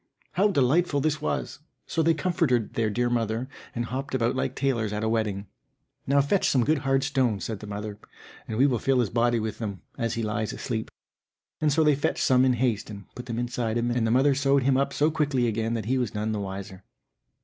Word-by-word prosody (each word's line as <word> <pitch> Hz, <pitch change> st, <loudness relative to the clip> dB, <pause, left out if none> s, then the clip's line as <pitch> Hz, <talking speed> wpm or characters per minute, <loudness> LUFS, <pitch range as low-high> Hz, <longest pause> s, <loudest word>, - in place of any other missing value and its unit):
How 190 Hz, +6 st, +3 dB
delightful 145 Hz, -1 st, +2 dB
this 155 Hz, +1 st, 0 dB
was! -, -, -2 dB, 0.3 s
so 165 Hz, -, -1 dB
they 165 Hz, +1 st, +3 dB
comforted 150 Hz, -, +1 dB
their 110 Hz, -2 st, +1 dB
dear 120 Hz, +3 st, 0 dB
mother 115 Hz, 0 st, -1 dB, 0.3 s
and 120 Hz, 0 st, -1 dB
hopped 130 Hz, +3 st, -4 dB
about 120 Hz, 0 st, +1 dB
like 130 Hz, 0 st, -1 dB
tailors 115 Hz, -6 st, 0 dB
at 105 Hz, +1 st, -2 dB
a -, -, +1 dB
wedding. 105 Hz, -3 st, -1 dB, 0.6 s
"Now 140 Hz, +1 st, +4 dB
fetch 160 Hz, +8 st, +2 dB
some 130 Hz, -3 st, +3 dB
good 155 Hz, +2 st, +2 dB
hard 135 Hz, 0 st, +1 dB
stones," 130 Hz, -8 st, 0 dB
said 110 Hz, -3 st, -4 dB
the 105 Hz, -, -9 dB
mother, 105 Hz, 0 st, -6 dB, 0.5 s
"and 110 Hz, -, -3 dB
we 135 Hz, -, +5 dB
will 125 Hz, -5 st, +2 dB
fill 135 Hz, +1 st, +2 dB
his 120 Hz, -5 st, +1 dB
body 120 Hz, 0 st, +2 dB
with 110 Hz, -1 st, -4 dB
them, 100 Hz, -5 st, -5 dB, 0.2 s
as 115 Hz, -2 st, -1 dB
he 115 Hz, -, -2 dB
lies 105 Hz, 0 st, -2 dB
asleep." 110 Hz, -4 st, -3 dB, 0.7 s
And 155 Hz, -1 st, +2 dB
so 160 Hz, +3 st, +3 dB
they 150 Hz, -1 st, +5 dB
fetched 145 Hz, -, 0 dB
some 130 Hz, -1 st, +4 dB
in 130 Hz, -, +4 dB
all 120 Hz, -, -5 dB
haste, 115 Hz, -6 st, 0 dB
and 100 Hz, -2 st, -10 dB
put 125 Hz, +1 st, -9 dB
them 115 Hz, -2 st, -3 dB
inside 120 Hz, -1 st, -1 dB
him, 120 Hz, +1 st, 0 dB
and 120 Hz, -2 st, +1 dB
the -, -, +1 dB
mother 135 Hz, +4 st, +4 dB
sewed 140 Hz, 0 st, +2 dB
him 135 Hz, 0 st, +3 dB
up 140 Hz, +1 st, +1 dB
so 150 Hz, +2 st, +2 dB
quickly 145 Hz, -5 st, +1 dB
again 115 Hz, 0 st, -1 dB
that 110 Hz, -3 st, -3 dB
he 130 Hz, +3 st, +1 dB
was 120 Hz, -4 st, -2 dB
none 105 Hz, +1 st, -1 dB
the 105 Hz, -, -2 dB
wiser. 95 Hz, -1 st, -6 dB
120 Hz, 230 wpm, -26 LUFS, 110-140 Hz, 0.7 s, we